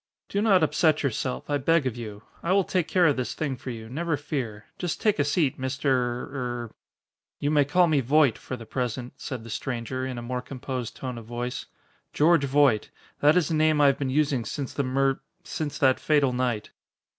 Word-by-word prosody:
"Do 200 - 0
not 195 -6 +4
upset 155 -1 +2
yourself, 130 -1 -2
I 145 -1 0
beg 165 +2 +3
of 125 -3 -1
you. 105 -3 -7 0.2
I 175 - +1
will 195 0 +4
take 180 -2 0
care 180 -2 +3
of 145 -4 +3
this 125 - -2
thing 145 -4 -2
for 130 - -8
you, 115 -2 -6
never 155 +5 -1
fear. 125 -8 -4
Just 175 -3 -2
take 210 -7 +2
a - - +4
seat, 145 -2 +1
Mister 135 +2 -1
er 120 -1 -2 0.3
" - - -67
"You 145 - 0
may 145 -2 +4
call 175 +5 +4
me 155 -4 +3
Voight 140 -1 +4
for 130 - -6
the 115 - -10
present," 125 +1 -3
said 130 -5 -6
the 115 - -9
stranger, 130 +2 -3
in 130 -1 -4
a 120 - -5
more 125 +1 -3
composed 125 -2 -5
tone 125 -3 -5
of 115 - -12
voice, 120 +2 -4 0.5
"George 160 -1 +4
Voight. 135 -5 +3 0.3
That 150 +4 +5
is 170 -5 +2
the - - -1
name 155 -1 +3
I 145 - +6
have 140 -1 +4
been 135 -2 -1
using 140 -3 +1
since 135 +3 -5
the - - 0
mur 135 0 +1 0.2
since 150 -2 -4
that 130 -2 +3
fatal 145 -4 +2
night." 125 -4 -1
135 Hz, 215 wpm, -26 LUFS, 125-150 Hz, 0.5 s, I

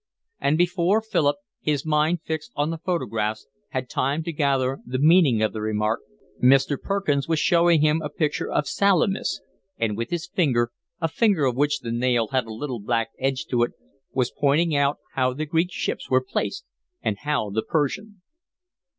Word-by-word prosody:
And 145 +3 +2
before 175 +3 +2
Philip, 160 -10 +1 0.2
his 150 -2 -1
mind 155 +2 +2
fixed 160 +7 -4
on 145 +2 0
the 165 - -5
photographs, 115 - -2 0.2
had 130 -1 -3
time 140 +6 -1
to 170 0 -4
gather 135 -3 +1
the 130 +2 -3
meaning 150 -6 +5
of 110 - 0
the 110 - -4
remark, 110 +1 0 0.4
Mr. 135 +3 +5
Perkins 175 -9 0
was 165 -1 +1
showing 170 -2 +4
him 155 +1 +3
a 150 - -4
picture 150 0 -1
of 150 - +1
Salamis, 195 -1 +1 0.4
and 110 -2 0
with 115 +2 -3
his 175 -1 -2
finger, 125 -10 +1 0.3
a 165 - +1
finger 190 -3 +2
of 125 -2 +1
which 145 +2 +1
the 115 - -4
nail 120 -1 +1
had 130 -3 0
a - - -7
little 125 +2 -4
black 115 +2 -1
edge 130 -4 -1
to 120 -2 +2
it, 120 - +1 0.4
was 125 -2 0
pointing 150 +3 +2
out 140 0 +2 0.2
how 130 -1 +1
the 155 +3 -2
Greek 165 +3 +1
ships - - -3
were 130 0 +2
placed - - -3 0.4
and 100 - -1
how 145 -8 -1
the 110 +2 0
Persian. 180 - -2
145 Hz, 180 wpm, -24 LUFS, 125-165 Hz, 0.4 s, meaning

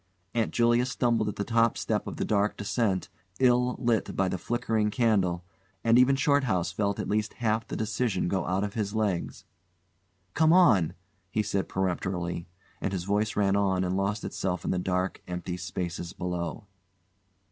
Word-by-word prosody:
Aunt 115 -2 0
Julia 120 +1 +3
stumbled 115 -4 +1
at 105 - -5
the 100 - -2
top 115 +1 +2
step - - -1
of - - -5
the - - -1
dark 105 0 +1
descent, 105 -3 0 0.3
ill 125 -1 +3
lit 120 -4 0
by 95 - +2
the 95 - -3
flickering 115 -2 0
candle, 100 -7 +1 0.4
and 115 +1 +5
even 130 +2 +5
Shorthouse 135 - +2
felt 100 -1 -1
at - - -2
least 105 +1 0
half 115 -1 0
the - - -5
decision 110 -2 -1
go 95 0 -1
out 95 +3 0
of 100 -1 -3
his 105 -1 -2
legs. 105 -6 -1 0.9
"Come 160 +1 +4
on!" 110 - +5 0.3
he 105 +3 0
said 100 -1 -1
peremptorily, 90 -2 -2 0.3
and 95 - -1
his 90 -2 -2
voice 105 +3 0
ran 100 -1 +2
on 95 -2 +2
and 90 0 -1
lost 100 +2 -1
itself 90 -2 -3
in - - 0
the 90 - 0
dark, 90 +1 -1
empty 90 0 -4
spaces 90 -1 -4
below. 90 0 -4
100 Hz, 170 wpm, -28 LUFS, 95-115 Hz, 0.9 s, and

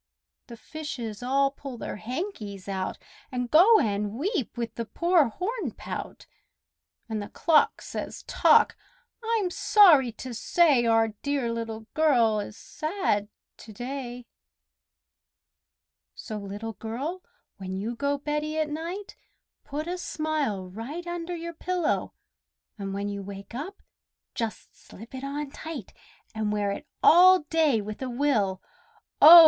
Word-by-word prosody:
The 235 - -10
fishes 245 -8 -6
all 275 +2 +2
pull 275 -3 -8
their - - -5
hankies 215 - -5
out, 190 -1 -2 0.3
And 245 -2 -3
go 405 +8 +8
and 205 - 0
weep 295 - -2
with 230 -1 -3
the 230 - -4
poor 340 - +3
hornpout, 420 - -5 0.8
And 220 -2 -3
the 205 - -7
clock 320 -2 +3
says, - - -6
"Tock! - - +5 0.5
I'm 445 -5 +1
sorry 330 - +6
to 255 +3 -7
say 270 0 +3
Our 225 0 +4
dear 280 -5 0
Little 225 -1 -4
Girl 240 -9 +4
is 205 +1 -6
sad 310 - -1 0.3
to 220 - -12
day!" 245 +1 -6 1.9
So, 215 -2 -6
Little 205 +3 -6
Girl, 270 - -4 0.4
when 190 -1 -5
you 225 +5 -3
go 285 +3 0
beddy 300 +2 -2
at 310 -1 0
night, 345 +6 -5 0.5
Put 295 +2 -4
a 360 +1 -3
smile 305 - -1
right 240 - -6
under 345 0 -4
your 340 0 -5
pillow, 350 0 -1 0.6
And 195 -2 -5
when 200 +1 -2
you 200 0 -4
wake 195 +1 -9
up, 310 +11 -6 0.5
just 225 -2 -4
slip 225 +6 -14
it 260 0 -6
on 280 +1 -4
tight, 305 - -7 0.4
And 215 -1 -1
wear 205 -1 0
it 290 +9 -6 0.2
all 365 +2 +8
day 310 -9 +3
with 210 +3 -7
a 260 - -2
will, 235 -8 +1 0.6
oh! 335 +3 +13
260 Hz, 135 wpm, -27 LUFS, 220-315 Hz, 1.9 s, oh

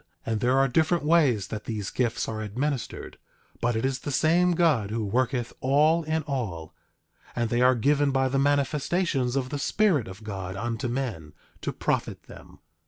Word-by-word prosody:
And 110 -1 -1
there 125 +3 +2
are 135 0 +4
different 160 +5 +1
ways 145 - +3
that 105 -1 -6
these 105 -4 -4
gifts 120 -2 -1
are 110 -1 -4
administered; 125 +5 -4 0.4
but 120 0 +1
it 110 - 0
is 135 -1 -1
the - - -6
same 170 +5 +3
God 155 - +2
who 110 0 -2
worketh 125 +3 -1
all 150 +5 +3
in 160 0 -1
all; 110 - -4 0.6
and 120 -2 -1
they 120 +1 +2
are 130 +1 +5
given 145 +4 +2
by 135 -1 +1
the 135 +1 0
manifestations 140 -1 +1
of 130 -2 -1
the 145 - -4
Spirit 180 - +2
of 95 +3 -10
God 95 -3 -5
unto 115 +4 -3
men, 115 - -4 0.3
to - - -2
profit - - -2
them. - - -14
130 Hz, 175 wpm, -26 LUFS, 110-145 Hz, 0.6 s, are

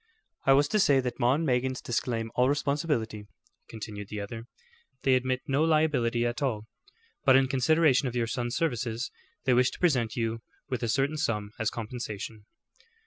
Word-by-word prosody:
"I 135 - +8
was 145 +2 +4
to 215 - +2
say 145 -9 +5
that 125 -1 -3
'Maw 120 +3 +4
and 160 +2 -1
Meggins' 130 -1 0
disclaim 115 -2 -2
all 125 +1 +3
responsibility," 140 -7 -1 0.4
continued 105 -2 -7
the 105 0 -5
other. 115 +3 -7 0.6
"They 135 - +4
admit 130 0 +1
no 140 +3 +1
liability 145 -7 +2
at 120 +4 -2
all, 110 -6 -1 0.6
but 135 -2 +6
in 135 0 +5
consideration 140 +1 +3
of 125 - -4
your 120 -1 +1
son's 120 +1 -3
services, 120 -5 -1 0.3
they 130 - +4
wish 125 +1 +4
to - - -11
present 125 -11 +2
you 115 -1 -2 0.3
with 125 -2 -3
a 120 - -1
certain 140 +5 +1
sum 105 -8 -1
as 110 -1 +1
compensation." 110 -2 -6
125 Hz, 175 wpm, -28 LUFS, 115-140 Hz, 0.6 s, I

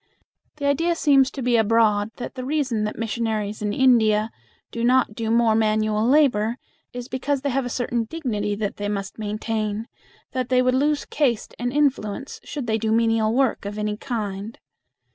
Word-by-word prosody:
The 290 -2 -5
idea 330 +5 +2
seems 275 -5 +4
to 270 -2 -6
be 245 -1 +3
abroad 220 -1 +3
that 245 - -6
the 255 - -6
reason 260 -6 0
that 210 - -4
missionaries 220 -2 -2
in 210 -1 -1
India 220 -3 +3 0.4
do 230 - -4
not 250 -2 +3
do 225 0 -3
more 230 -1 +3
manual 215 0 +1
labor 245 -6 +3 0.3
is 245 0 -7
because 270 +1 -2
they 280 0 -1
have 265 0 0
a - - -4
certain 240 -1 -1
dignity 220 -8 -2
that 205 -1 -3
they 205 0 -3
must 200 0 -4
maintain; 215 +1 -3 0.4
that 255 -2 -2
they 255 -1 +3
would 255 0 +2
lose 290 +3 +1
caste 250 -7 -1
and 245 +1 -1
influence 270 -3 -1
should 285 -5 -5
they 220 -1 0
do 220 0 -1
menial 225 -1 +2
work 260 0 +1
of 205 +1 -5
any 210 0 -1
kind. 210 -3 -5
230 Hz, 180 wpm, -23 LUFS, 215-260 Hz, 0.4 s, seems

